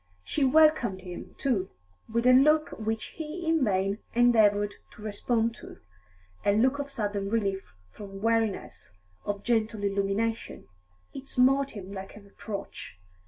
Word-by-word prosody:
She 290 Hz, -, -1 dB
welcomed 265 Hz, -8 st, +4 dB
him, 180 Hz, -1 st, -9 dB
too, 215 Hz, -9 st, 0 dB, 0.4 s
with 235 Hz, +1 st, 0 dB
a 255 Hz, -, +7 dB
look 305 Hz, +4 st, +5 dB
which 220 Hz, 0 st, -3 dB
he 325 Hz, +2 st, -5 dB
in 325 Hz, -3 st, +3 dB
vain 195 Hz, -1 st, 0 dB, 0.2 s
endeavoured 210 Hz, -4 st, +4 dB, 0.2 s
to 210 Hz, -, -13 dB
respond 225 Hz, +2 st, 0 dB
to -, -, -11 dB, 0.7 s
a 200 Hz, -, +3 dB
look 260 Hz, +6 st, +2 dB
of 285 Hz, 0 st, -4 dB
sudden 205 Hz, -6 st, -2 dB
relief 195 Hz, -, -2 dB, 0.2 s
from 195 Hz, -2 st, -10 dB
weariness, 215 Hz, -, -1 dB, 0.3 s
of 205 Hz, 0 st, -3 dB
gentle 220 Hz, -3 st, 0 dB
illumination; 200 Hz, -, -1 dB, 0.5 s
it 270 Hz, 0 st, -8 dB
smote 270 Hz, 0 st, +2 dB
him 195 Hz, -1 st, -8 dB
like 195 Hz, +1 st, -8 dB
a -, -, -12 dB
reproach. 200 Hz, -, -8 dB
220 Hz, 140 wpm, -28 LUFS, 200-255 Hz, 0.7 s, a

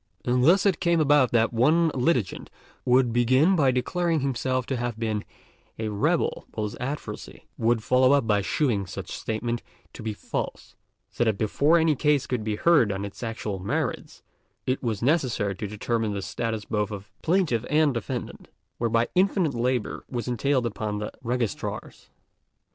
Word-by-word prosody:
And 125 Hz, 0 st, +2 dB
thus 180 Hz, +8 st, +5 dB
it 190 Hz, -4 st, +2 dB
came 170 Hz, -2 st, +2 dB
about 145 Hz, -4 st, +4 dB
that 115 Hz, 0 st, +2 dB
one 155 Hz, +8 st, +4 dB
litigant 125 Hz, -, 0 dB, 0.4 s
would 125 Hz, -1 st, +3 dB
begin 130 Hz, +10 st, +4 dB
by 140 Hz, -6 st, +3 dB
declaring 165 Hz, +5 st, 0 dB
himself 130 Hz, -1 st, -1 dB
to 130 Hz, -, -2 dB
have 120 Hz, -2 st, -3 dB
been 110 Hz, -2 st, -2 dB, 0.5 s
a 110 Hz, -1 st, -2 dB
"rebel," 105 Hz, -1 st, 0 dB
while 110 Hz, -, -2 dB
his 105 Hz, -, -4 dB
adversary 125 Hz, -4 st, -6 dB
would 115 Hz, -1 st, +1 dB
follow 130 Hz, +3 st, +4 dB
up 140 Hz, -4 st, +3 dB
by 105 Hz, -2 st, +2 dB
shewing 100 Hz, -2 st, 0 dB
such -, -, -7 dB
statement 115 Hz, +2 st, -3 dB, 0.3 s
to -, -, -9 dB
be 110 Hz, -1 st, -3 dB
false; -, -, -5 dB, 0.4 s
so -, -, 0 dB
that 110 Hz, -3 st, +1 dB
before 140 Hz, +10 st, +3 dB
any 160 Hz, -2 st, +3 dB
case 145 Hz, -1 st, +2 dB
could 125 Hz, -4 st, -2 dB
be 105 Hz, -1 st, -1 dB
heard 135 Hz, -4 st, +4 dB
on 95 Hz, +1 st, -3 dB
its 100 Hz, -, -9 dB
actual 110 Hz, -4 st, -4 dB
merits, 95 Hz, -, -3 dB, 0.4 s
it 130 Hz, +1 st, -1 dB
was 115 Hz, -3 st, -2 dB
necessary 125 Hz, -8 st, +1 dB
to 105 Hz, +3 st, -5 dB
determine 110 Hz, +1 st, -2 dB
the 100 Hz, -1 st, -4 dB
status 110 Hz, -2 st, -3 dB
both 105 Hz, -1 st, -1 dB
of 100 Hz, -2 st, -8 dB
plaintiff 165 Hz, -, +1 dB
and 150 Hz, -1 st, +3 dB
defendant, 120 Hz, +1 st, -5 dB, 0.3 s
whereby 115 Hz, 0 st, +2 dB
infinite 185 Hz, -4 st, +2 dB
labour 120 Hz, 0 st, -1 dB
was 120 Hz, -1 st, -4 dB
entailed 125 Hz, +1 st, +1 dB
upon 105 Hz, -2 st, -3 dB
the 105 Hz, 0 st, -4 dB
Registrars. 120 Hz, -2 st, -4 dB
120 Hz, 165 wpm, -26 LUFS, 110-140 Hz, 0.5 s, thus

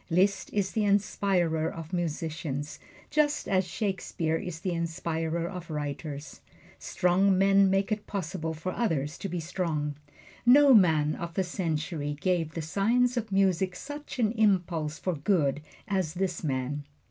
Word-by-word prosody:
Liszt 190 Hz, +4 st, +2 dB
is 200 Hz, -2 st, 0 dB
the 220 Hz, -, 0 dB
inspirer 190 Hz, -5 st, +1 dB
of 165 Hz, +1 st, -8 dB
musicians, 160 Hz, -4 st, -3 dB, 0.3 s
just 300 Hz, -1 st, +1 dB
as 190 Hz, -1 st, +2 dB
Shakespeare 180 Hz, -4 st, -2 dB
is 170 Hz, -2 st, -5 dB
the 185 Hz, -1 st, -1 dB
inspirer 165 Hz, 0 st, -2 dB
of 180 Hz, -2 st, -7 dB
writers. 145 Hz, -1 st, -5 dB, 0.4 s
Strong 185 Hz, +2 st, +2 dB
men 195 Hz, 0 st, +5 dB
make 195 Hz, +2 st, +1 dB
it 210 Hz, 0 st, -2 dB
possible 165 Hz, -4 st, -3 dB
for 160 Hz, +4 st, -4 dB
others 160 Hz, -, -1 dB
to 195 Hz, -, -4 dB
be 175 Hz, 0 st, -3 dB
strong. 160 Hz, -3 st, -2 dB, 0.5 s
No 275 Hz, +3 st, +7 dB
man 160 Hz, -8 st, +5 dB
of 170 Hz, -2 st, -6 dB
the 190 Hz, -, +2 dB
century 160 Hz, -4 st, -2 dB
gave 170 Hz, -3 st, 0 dB
the 165 Hz, -, -3 dB
science 235 Hz, +9 st, +2 dB
of 225 Hz, -3 st, -3 dB
music 190 Hz, -1 st, +2 dB
such 290 Hz, +7 st, -7 dB
an 220 Hz, -4 st, +2 dB
impulse 180 Hz, -8 st, +1 dB
for 185 Hz, +4 st, -2 dB
good 150 Hz, -3 st, +1 dB, 0.3 s
as 190 Hz, -6 st, -1 dB
this 180 Hz, -2 st, -2 dB
man. 140 Hz, 0 st, -2 dB
175 Hz, 145 wpm, -28 LUFS, 160-195 Hz, 0.5 s, No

